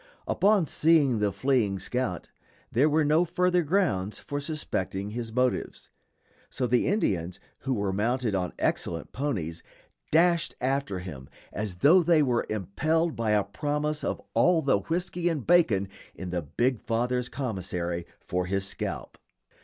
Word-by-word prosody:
Upon 200 -3 +3
seeing 150 -6 +3
the 105 -1 +1
fleeing 105 -2 +1
scout, 95 - -3 0.4
there 140 +7 +3
were 155 0 +2
no 155 +4 +4
further 180 +1 +2
grounds 145 - 0
for 145 - -4
suspecting 105 - -3
his 115 0 -5
motives; 125 +2 -1 0.6
so 125 - -2
the 125 0 +2
Indians, 95 - 0 0.2
who 135 -1 -1
were 100 -3 -1
mounted 115 +2 0
on 90 -3 -1
excellent - - -1
ponies, 95 - -3 0.5
dashed 170 +1 +3
after 135 -5 -1
him 75 -8 -8 0.2
as 105 -3 -3
though 155 - +6
they 165 -2 +4
were 125 -3 0
impelled 155 - 0
by 115 -1 -1
a 105 -1 +3
promise 150 +7 -2
of - - -2
all 175 -3 +4
the 135 -7 +3
whisky 175 - -1
and 150 -7 -3
bacon 130 - +4 0.3
in 90 -2 -6
the 90 -1 -1
big 120 - 0
father's 125 +2 -1
commissary 90 -8 -3
for 90 0 -2
his 95 +1 -1
scalp. 100 - -5
125 Hz, 145 wpm, -27 LUFS, 95-155 Hz, 0.6 s, though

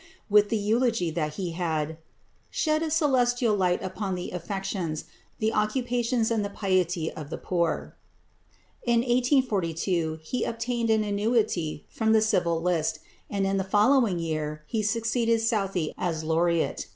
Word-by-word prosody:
with 205 0 +5
the 225 - +1
eulogy 220 -3 +1
that 155 -2 -2
he 180 -1 -3
had 160 -2 -2 0.5
"shed 310 -1 +1
a 325 - -1
celestial 250 -7 +2
light 180 -2 +1
upon 190 0 -3
the 180 - -5
affections, 180 -2 -3 0.3
the 220 0 0
occupations 235 +1 0
and 220 -2 +1
the 200 - -3
piety 185 -5 0
of 150 -2 -8
the - - -4
poor." 170 -3 -1 0.9
In 235 -1 +2
1842 200 - +1
he 250 +10 -2
obtained 230 0 -2
an 220 -1 +3
annuity 205 -7 0
from 220 -1 +1
the 220 - +5
Civil 170 -6 +1
List, 165 -3 +1 0.3
and 200 -1 0
in 195 0 +1
the 190 - 0
following 210 +1 +3
year 155 -2 -3
he 220 +8 -1
succeeded 230 +2 +1
Southey 195 -7 0
as 160 -3 -1
laureate. 165 +1 +1
200 Hz, 145 wpm, -27 LUFS, 170-230 Hz, 0.9 s, with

